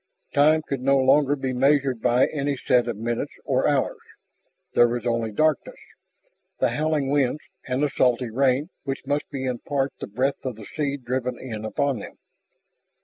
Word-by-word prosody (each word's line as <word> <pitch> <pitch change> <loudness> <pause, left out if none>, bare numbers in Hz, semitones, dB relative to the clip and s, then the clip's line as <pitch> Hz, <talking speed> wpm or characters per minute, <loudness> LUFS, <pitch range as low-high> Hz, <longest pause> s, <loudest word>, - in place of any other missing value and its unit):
Time 155 +2 +4
could 140 -3 -3
no 135 +1 +3
longer 135 +2 +4
be 135 -2 -3
measured 135 -2 +2
by 125 +2 +4
any 145 -2 -2
set 125 -1 +2
of 115 -3 -3
minutes 115 +2 -3
or - - +1
hours. - - +1 0.7
There 120 - +6
was 120 +1 -3
only 115 -2 0
darkness, 155 +6 0 0.8
the - - +2
howling 150 -3 0
winds, 145 0 +1 0.3
and 130 +2 0
the 145 - +2
salty 125 -3 +1
rain 135 - +1
which 135 0 -4
must 145 +1 -1
be 135 -2 -4
in 125 -2 -2
part 140 -1 -1
the - - -5
breath 130 +7 -1
of 130 -3 -3
the 110 -1 -11
sea 140 +1 -2
driven 125 -1 -3
in 110 -5 -6
upon 130 +3 -1
them. - - -10
130 Hz, 175 wpm, -24 LUFS, 120-145 Hz, 0.8 s, There